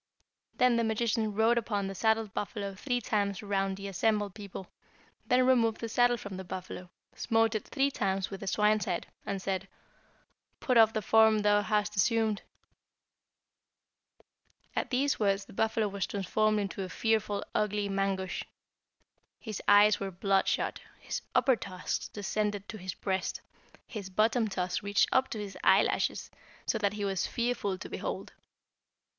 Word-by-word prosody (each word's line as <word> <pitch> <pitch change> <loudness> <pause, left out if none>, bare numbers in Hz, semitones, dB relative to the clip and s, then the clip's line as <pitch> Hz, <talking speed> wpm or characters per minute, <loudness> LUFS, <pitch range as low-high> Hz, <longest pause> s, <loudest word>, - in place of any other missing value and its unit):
Then 250 -2 +4
the 230 - +2
magician 220 0 0
rode 225 +2 +4
upon 205 -3 -2
the 195 - -4
saddled 220 0 +1
buffalo 200 -1 -4
three 245 +5 -2
times 200 -3 -1
around 195 -1 -1
the 200 0 -6
assembled 205 +1 0
people, 200 -2 -8 0.6
then 250 0 +4
removed 230 -4 +3
the 230 - -3
saddle 245 +2 +3
from 200 -4 -7
the 190 - -6
buffalo, 180 0 -7 0.2
smote 225 -1 +1
it 215 - -3
three 280 0 +1
times 195 -5 -1
with 195 - -6
the 195 - -7
swine's 210 +2 +2
head, 180 -4 -2 0.2
and 200 -1 -2
said, 190 0 -3 0.9
'Put 255 - 0
off 225 -1 +7
the 215 - -2
form 220 0 +5
thou 205 0 +4
hast 210 0 0
assumed.' 220 +1 +2 2.3
"At - - -1
these 275 +2 +1
words 195 -2 +1
the - - -14
buffalo 220 +1 +1
was 200 -1 -3
transformed 215 +2 +1
into 200 -1 -3
a 185 - -4
fearful 215 -2 0
ugly 210 -1 0
Mangusch. 195 -1 -1 1.0
His 215 -4 -6
eyes 205 +1 +6
were 195 - -3
bloodshot, 195 +1 0 0.2
his - - -4
upper 260 - +5
tusks 185 -5 -4
descended 205 0 -2
to 215 - -7
his 185 0 -5
breast, 190 -1 -2 0.4
his 200 -5 -7
bottom 220 +4 +2
tusks 185 -2 -2
reached 205 0 +2
up 260 0 +3
to - - -4
his 205 -2 -6
eyelashes, - - +2 0.3
so 225 - 0
that 205 -1 +1
he 205 -1 -3
was 195 -2 -1
fearful 235 -5 -1
to - - -8
behold. - - -5
210 Hz, 155 wpm, -30 LUFS, 195-225 Hz, 2.3 s, off